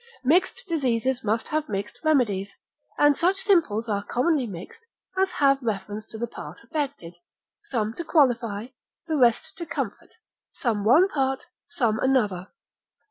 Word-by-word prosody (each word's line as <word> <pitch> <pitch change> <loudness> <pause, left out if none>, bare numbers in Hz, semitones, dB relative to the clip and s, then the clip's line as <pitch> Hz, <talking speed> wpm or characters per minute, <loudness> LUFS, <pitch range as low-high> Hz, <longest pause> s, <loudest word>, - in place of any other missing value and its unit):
Mixed 365 - +2
diseases 260 - 0
must 220 +1 -1
have 310 0 -1
mixed 200 +1 -4
remedies, 210 -11 +1 0.4
and 290 -1 +5
such 365 +6 +2
simples 320 - +2
are 205 -2 0
commonly 255 +5 +1
mixed 195 - -9 0.3
as 380 0 +2
have 275 -1 +3
reference 210 -1 -4
to 220 - -8
the 235 - -1
part 235 - -9
affected, 280 - -4 0.5
some 225 - -1
to 340 - -5
qualify, 245 - +2 0.4
the 320 -2 -1
rest 240 -5 +2
to 340 - -4
comfort, - - -4 0.4
some 220 -5 -1
one 280 - +6
part, 270 -6 -1 0.2
some 225 -4 0
another. 210 -9 +1
250 Hz, 140 wpm, -25 LUFS, 215-305 Hz, 0.5 s, one